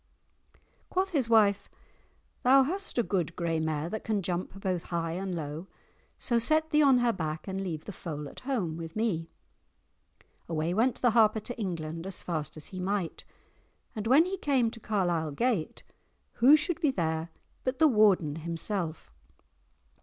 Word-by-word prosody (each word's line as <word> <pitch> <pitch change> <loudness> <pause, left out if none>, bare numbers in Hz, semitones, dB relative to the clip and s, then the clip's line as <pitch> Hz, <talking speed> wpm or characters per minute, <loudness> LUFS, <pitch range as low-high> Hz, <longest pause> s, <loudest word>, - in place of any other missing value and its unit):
[#] - - -43
Suffer. - - -29 0.3
Quoth 375 +1 0
his 270 -8 0
wife, 210 -3 +4 0.7
"Thou 270 +2 +6
hast 380 +5 -4
a 240 - +3
good 175 -6 -1
grey 165 -2 -1
mare 160 -1 -1
that 215 +5 -5
can 210 -3 -1
jump 180 +2 -3
both 185 -3 -2
high 165 -1 -2
and 185 +1 -3
low; 155 +2 -5 0.5
so 235 -2 +1
set 315 +6 +2
thee 300 0 +4
on 275 -3 +6
her 240 -1 +2
back 155 -2 -4
and 190 0 -3
leave 165 -5 -4
the - - -6
foal 150 -6 -6
at - - -11
home 215 - -2
with 165 -1 -7
me." 190 -8 -1 1.2
Away 165 +1 -1
went 230 +5 +1
the 245 - +5
Harper 220 -1 +4
to 245 +3 -5
England 165 -3 -4
as 195 - -6
fast 155 -3 -3
as 155 - -8
he 185 - -5
might, 190 -2 -2 0.7
and 215 0 -3
when 280 +7 +6
he 385 +1 -3
came 260 -8 +2
to 230 - -10
Carlisle 175 -8 0
gate, 220 - -1 0.5
who 265 +6 +7
should 325 +1 -2
be 305 - +3
there 160 -7 -1 0.3
but 255 0 -1
the 315 - +6
Warden 200 - +3
himself? 165 - -4
195 Hz, 175 wpm, -29 LUFS, 165-240 Hz, 1.2 s, who